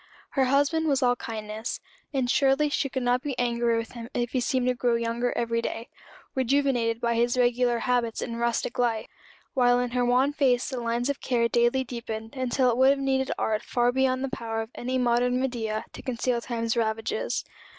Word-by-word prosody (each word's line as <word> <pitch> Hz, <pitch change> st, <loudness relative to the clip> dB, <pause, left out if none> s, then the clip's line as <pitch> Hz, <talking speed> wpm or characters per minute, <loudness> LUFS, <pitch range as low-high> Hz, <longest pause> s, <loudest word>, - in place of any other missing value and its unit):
Her 270 Hz, -2 st, +2 dB
husband 285 Hz, +5 st, +2 dB
was 275 Hz, -2 st, +2 dB
all 245 Hz, 0 st, +4 dB
kindness; 220 Hz, -1 st, -5 dB, 0.3 s
and 265 Hz, -4 st, 0 dB
surely 275 Hz, +2 st, +3 dB
she 280 Hz, -1 st, 0 dB
could 260 Hz, -1 st, -3 dB
not 245 Hz, +1 st, +2 dB
be 275 Hz, -2 st, -4 dB
angry 235 Hz, -1 st, +1 dB
with 230 Hz, 0 st, -4 dB
him 235 Hz, -1 st, -8 dB
if 240 Hz, 0 st, -1 dB
he 260 Hz, -, 0 dB
seemed 250 Hz, +1 st, 0 dB
to 250 Hz, -, +3 dB
grow 240 Hz, -1 st, +1 dB
younger 235 Hz, +1 st, -1 dB
every 230 Hz, 0 st, 0 dB
day 230 Hz, 0 st, -5 dB, 0.4 s
rejuvenated 260 Hz, -3 st, +1 dB
by 235 Hz, -1 st, +2 dB
regular 245 Hz, 0 st, +2 dB
habits 235 Hz, -1 st, 0 dB
and 230 Hz, -1 st, -4 dB
rustic 235 Hz, 0 st, -1 dB
life 230 Hz, -3 st, +1 dB, 0.5 s
while 245 Hz, -1 st, +4 dB
in 245 Hz, -1 st, -1 dB
her 250 Hz, 0 st, +1 dB
wan 255 Hz, +4 st, +3 dB
face 255 Hz, -4 st, +2 dB
the 255 Hz, -, -3 dB
lines 235 Hz, +3 st, 0 dB
of 280 Hz, -, -7 dB
care 235 Hz, -2 st, +1 dB
daily 240 Hz, +3 st, +2 dB
deepened, 225 Hz, -2 st, -6 dB
until 255 Hz, 0 st, +1 dB
it 235 Hz, -, -1 dB
would 260 Hz, +1 st, +6 dB
have 280 Hz, -, +4 dB
needed 265 Hz, -1 st, 0 dB
art 215 Hz, -1 st, 0 dB
far 245 Hz, 0 st, +1 dB
beyond 260 Hz, 0 st, +1 dB
the 270 Hz, -, -1 dB
power 225 Hz, -4 st, -3 dB
of 220 Hz, -, -13 dB
any 255 Hz, +2 st, -2 dB
modern 245 Hz, 0 st, +2 dB
Medea 225 Hz, -4 st, -2 dB
to -, -, -9 dB
conceal 245 Hz, -1 st, -1 dB
Time's 230 Hz, -2 st, -2 dB
ravages. 225 Hz, -, -1 dB
245 Hz, 195 wpm, -26 LUFS, 235-260 Hz, 0.5 s, would